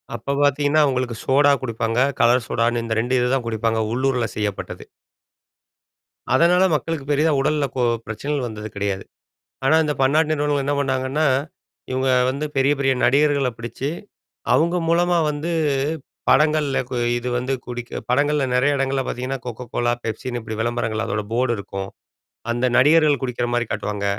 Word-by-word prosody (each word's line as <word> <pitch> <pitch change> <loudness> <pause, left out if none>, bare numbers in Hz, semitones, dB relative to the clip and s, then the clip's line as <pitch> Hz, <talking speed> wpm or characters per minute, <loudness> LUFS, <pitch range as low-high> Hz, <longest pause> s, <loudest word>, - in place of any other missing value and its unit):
அப்பப் 140 +5 -2
பாத்தீங்கன்னா, 145 +2 +3
உங்களுக்கு 125 -3 -2
சோடா 140 +2 +4
குடிப்பாங்க. 115 -1 -1 0.2
கலர் 120 0 +4
சோடான்னு 115 0 0
இந்த 115 - -2
2 125 +2 0
இது 125 0 +1
தான் 125 - -2
குடிப்பாங்க. 115 0 0
உள்ளூர்ல 125 -2 0
செய்யப்பட்டது. 105 -2 -4 1.5
அதனால 170 +6 +4
மக்களுக்குப் 150 -1 -3
பெரிதா 150 +3 +2
உடல்ல 150 +1 +1
கொ 125 - +1 0.2
பிரச்சனைகள் 135 +4 -3
வந்தது 105 -1 -7
கிடையாது. 100 -1 -2 0.6
ஆனா, 135 - +4
அந்தப் 150 -3 -2
பன்னாட்டு 155 +4 +3
நிறுவனங்கள் 145 -2 0
என்னா 145 +1 0
பண்ணாங்கன்னா, 135 +2 0 0.6
இவுங்க 130 +1 0 0.2
வந்து 140 +3 -3
பெரிய 135 +1 +3
பெரிய 135 -1 +2
நடிகர்களப் 140 -2 +2
பிடிச்சு, 120 +4 -5 0.7
அவுங்க 170 +2 +2
மூலமா 175 +1 +3
வந்து, 150 +3 -4 0.8
படங்கள்ல 150 -2 +3
கு 130 - -3 0.2
இது 120 +1 -4
வந்து 130 +2 -1
குடிக்க 120 0 -6
படங்கள்ல 145 +2 +2
நெறையா 140 +3 +3
இடங்கள்ல 135 0 0
பாத்தீங்கன்னா, 130 +2 -3
கொக்கோ 125 0 -6
கோலா, 120 0 +1
பெப்சின்னு 120 +2 -4
இப்படி 110 -1 -6
விளம்பரங்கள் 115 -1 -1
அதோட 105 -1 -2
போர்டு 120 +1 +1
இருக்கும். 95 -1 -6 0.6
அந்த 120 +2 0
நடிகர்கள் 150 0 +4
குடிக்கிற 120 -1 -2
மாரி 120 -1 +1
காட்டுவாங்க. 105 -1 -3
130 Hz, 145 wpm, -21 LUFS, 120-145 Hz, 1.5 s, சோடா